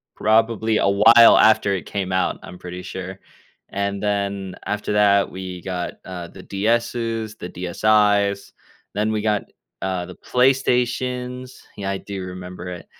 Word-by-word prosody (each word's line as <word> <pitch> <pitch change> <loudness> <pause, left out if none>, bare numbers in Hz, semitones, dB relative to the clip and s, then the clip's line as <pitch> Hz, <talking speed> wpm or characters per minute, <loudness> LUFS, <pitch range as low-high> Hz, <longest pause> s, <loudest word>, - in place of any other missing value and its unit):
probably 110 0 +2
a 100 - +2
while 115 +4 +7
after 110 -2 +4
it 85 -6 -5
came 95 -2 -3
out, 95 - 0
I'm 90 - -10
pretty 90 0 -8
sure. 95 0 -7 0.5
And 100 0 -2
then, 100 -2 -2
after 105 0 -2
that, 100 -1 +4
we 90 -2 -7
got, 90 -2 -4
uh, 90 -2 -7
the 95 - -13
DS's, 115 +1 -1
the 90 - -7
DSIs, 100 +2 +1 0.4
then 105 +1 0
we 105 -1 -1
got 105 -2 +1
n - - -22 0.3
uh, 95 -2 -2
the 90 - -10
PlayStations 125 0 0
Yeah, 100 -1 -3
I 100 - -2
do 95 -2 -6
remember 90 0 -8
it. 90 -1 -8
100 Hz, 150 wpm, -22 LUFS, 95-110 Hz, 0.5 s, while